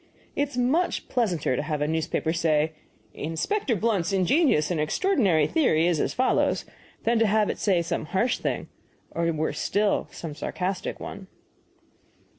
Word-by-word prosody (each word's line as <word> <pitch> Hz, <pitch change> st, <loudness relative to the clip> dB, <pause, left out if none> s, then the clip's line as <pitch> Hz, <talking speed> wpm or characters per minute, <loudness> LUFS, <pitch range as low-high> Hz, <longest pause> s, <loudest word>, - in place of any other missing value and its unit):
It 285 Hz, 0 st, 0 dB
is 250 Hz, -, -9 dB
much 270 Hz, +9 st, +1 dB
pleasanter 180 Hz, -, 0 dB
to -, -, -1 dB
have 150 Hz, -3 st, -2 dB
a 150 Hz, -, 0 dB
newspaper 160 Hz, 0 st, -1 dB
say, 160 Hz, -2 st, +2 dB, 0.4 s
'Inspector 230 Hz, -, -1 dB
Blunt's 200 Hz, -3 st, 0 dB
ingenious 190 Hz, -, +3 dB
and 170 Hz, -, 0 dB
extraordinary 190 Hz, -, +2 dB
theory 160 Hz, -, +2 dB
is 175 Hz, -3 st, +2 dB
as -, -, 0 dB
follows,' 255 Hz, +2 st, +1 dB, 0.4 s
than 235 Hz, 0 st, +2 dB
to 225 Hz, -, +4 dB
have 210 Hz, 0 st, +2 dB
it -, -, -8 dB
say 185 Hz, -5 st, +2 dB
some 165 Hz, -, -2 dB
harsh 235 Hz, +8 st, +1 dB
thing, -, -, -2 dB, 0.4 s
or, 170 Hz, 0 st, 0 dB
worse 155 Hz, 0 st, -2 dB
still, 205 Hz, +1 st, +1 dB
some 165 Hz, -3 st, -7 dB
sarcastic 185 Hz, +5 st, -3 dB
one." -, -, -8 dB
180 Hz, 155 wpm, -26 LUFS, 160-235 Hz, 0.4 s, to